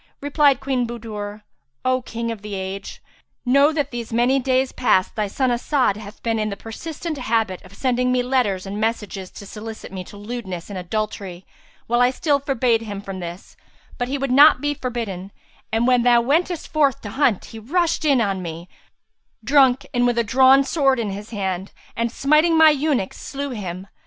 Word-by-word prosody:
Replied 285 -2 +3
Queen 260 -3 0
Budur, 215 -3 -6 0.4
"O 255 0 +2
King 230 -1 -4
of 220 -3 -7
the 210 -1 -6
age, 190 +1 -6 0.4
know 280 +4 +5
that 290 -3 -2
these 240 -2 -5
many 245 +4 +3
days 260 0 +1
past 190 -7 +1
thy 215 -2 0
son 255 +5 0
As'ad 250 -2 +1
hath 210 -1 -11
been 225 -1 0
in 215 0 -1
the 200 - -5
persistent 310 +6 -6
habit 225 -6 0
of 190 +1 -15
sending 250 +1 +1
me 250 0 +2
letters 245 -8 0
and 200 +2 -4
messages 210 -4 -2
to 200 - -11
solicit 215 +1 -8
me 190 -1 -5
to 205 - -12
lewdness 205 -4 -6
and 190 - -4
adultery 190 -1 -4 0.4
while 240 +1 +1
I 245 - +5
still 285 +2 +1
forbade 255 -5 +1
him 205 -3 -6
from 195 -1 -7
this, 175 +1 -8 0.4
but 245 - -1
he 275 +2 -2
would 275 -1 -2
not 285 +1 +7
be 290 +2 0
forbidden; 225 -8 -5 0.4
and, 225 +2 +1
when 250 -1 +4
thou 240 0 +5
wentest 320 +6 0
forth 285 -5 +2
to 205 - -7
hunt, 260 -7 +1
he 225 - -7
rushed 330 +10 0
in 280 -5 +3
on 195 -3 -1
me, 170 0 -7 0.8
drunk 270 +1 +4
and 245 -1 +3
with 240 -1 0
a 235 - +3
drawn 265 +4 +5
sword 270 -1 +2
in 220 -4 -2
his 205 +2 -7
hand, 190 -3 -3 0.2
and 230 0 -1
smiting 305 +6 +3
my 320 -1 +8
eunuch, 285 -8 0
slew 280 0 -5
him. 185 -5 -5
240 Hz, 190 wpm, -22 LUFS, 205-270 Hz, 0.8 s, my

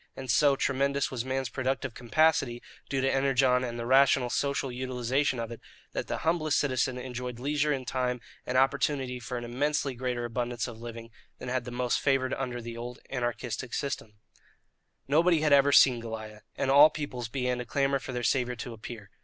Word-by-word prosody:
And, 130 -2 -3
so 140 +4 +4
tremendous 140 +1 0
was 125 -3 -3
man's 130 -1 -2
productive 130 -1 -2
capacity, 125 -1 +1 0.3
due 135 -1 0
to 135 - +1
Energon 135 -2 +3
and 120 -1 -4
the 115 - -4
rational 130 -1 +4
social 140 -2 -1
utilization 130 +2 -1
of 115 0 -4
it, 115 - -8 0.3
that - - -4
the - - -2
humblest 160 -2 +2
citizen 130 -2 0
enjoyed 125 -1 -5
leisure 150 +3 +1
and 135 -3 -2
time 125 -1 -1 0.2
and 125 - -1
opportunity 135 -1 +1
for 125 +1 -5
an 120 - -5
immensely 140 +3 -1
greater 125 -1 -3
abundance 120 0 -2
of 115 -2 -9
living 115 -1 -8 0.3
than 125 - -7
had 125 -1 -1
the 125 - -6
most 125 0 0
favoured 135 -2 +1
under 125 -3 -3
the 115 0 -6
old 120 +1 -6
anarchistic 120 -1 -3
system. 140 -6 -3 0.9
Nobody 160 +3 +4
had 150 -2 +3
ever 140 0 +6
seen 130 -3 +6
Goliah, 110 -2 -7
and 135 - 0
all 145 +3 +9
peoples 125 -7 -5
began 125 0 -1
to 125 - -4
clamour 140 +2 +1
for 130 - -7
their 125 -1 -3
saviour 125 0 +1
to 120 +1 -6
appear. 110 -2 -9
130 Hz, 185 wpm, -29 LUFS, 120-135 Hz, 0.9 s, all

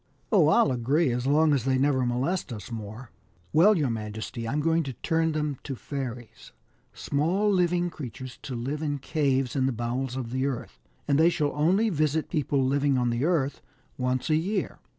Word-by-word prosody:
" - - -39
Oh! 185 -9 +5
I'll 155 -3 +4
agree, 130 +5 +1
as 125 +2 -2
long 150 +2 +4
as 135 -5 +1
they 130 0 +1
never 135 -1 +2
molest 135 +7 -1
us 110 +1 -7
more/' 110 +2 -7 0.2
" 85 0 -35
Well, 195 +6 +6
your 140 -6 +1
majesty, 110 +2 -5
I'm 140 +6 -1
going 165 +2 +2
to 135 -4 -5
turn 160 +4 0
them 150 -3 -2
to 135 - -5
fairies 125 - -7 0.4
small 180 +9 0
living 175 -2 +1
creatures 130 -3 -8
to 130 - -6
live 135 +6 -3
in 145 -2 -1
caves 135 -3 0
in 130 -1 +2
the - - +1
bowels 120 +2 -3
of 125 -3 -4
the 130 +2 0
earth, 135 -4 -5 0.3
and 140 0 +3
they 165 +2 +6
shall 150 -4 -1
only 185 +9 +2
visit 155 -1 0
people 145 -4 +1
living 140 0 +2
on 120 -1 +1
the 120 +4 0
earth 145 -6 0 0.3
once 125 +3 -1
a - - +5
year. 190 +6 -2
140 Hz, 195 wpm, -27 LUFS, 125-155 Hz, 0.4 s, Well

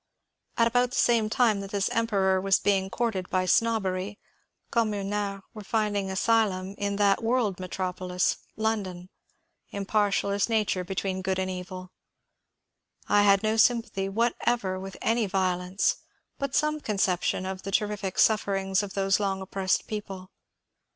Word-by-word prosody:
About 245 +2 +3
the 255 - -7
same 230 -3 +3
time 220 -2 +2
that 195 0 -6
this 200 -1 0
Emperor 200 -5 +1
was 195 0 +3
being 195 -1 +1
courted 200 -5 -2
by 185 0 +1
snobbery, 205 -2 +1 0.5
"communards" 205 -3 -1
were 215 - -9
finding 205 -2 -1
asylum 195 -2 +1
in 200 0 -1
that 200 -1 +3
world 225 -5 0
metropolis, 180 0 -1 0.2
London, 195 -5 -2 0.6
impartial 200 0 0
as 200 +3 0
Nature 210 -5 +1
between 190 0 -3
good 190 0 -1
and 190 0 -1
evil. 185 0 -7 1.2
I 205 - +4
had 200 0 +4
no 215 +1 +1
sympathy 225 -4 +2
whatever 230 -2 0
with 195 0 -8
any 225 -1 +2
vio 185 -2 +1
lence, 180 +2 0 0.4
but 275 -1 -2
some 305 0 +1
conception 190 -4 0
of 190 0 -5
the - - -6
terrific 200 -1 -1
sufferings 195 -3 +2
of 200 -2 -7
those 195 0 +2
long 195 -2 -1
oppressed 190 0 -1
people. 195 -3 -6
200 Hz, 140 wpm, -27 LUFS, 190-220 Hz, 1.2 s, I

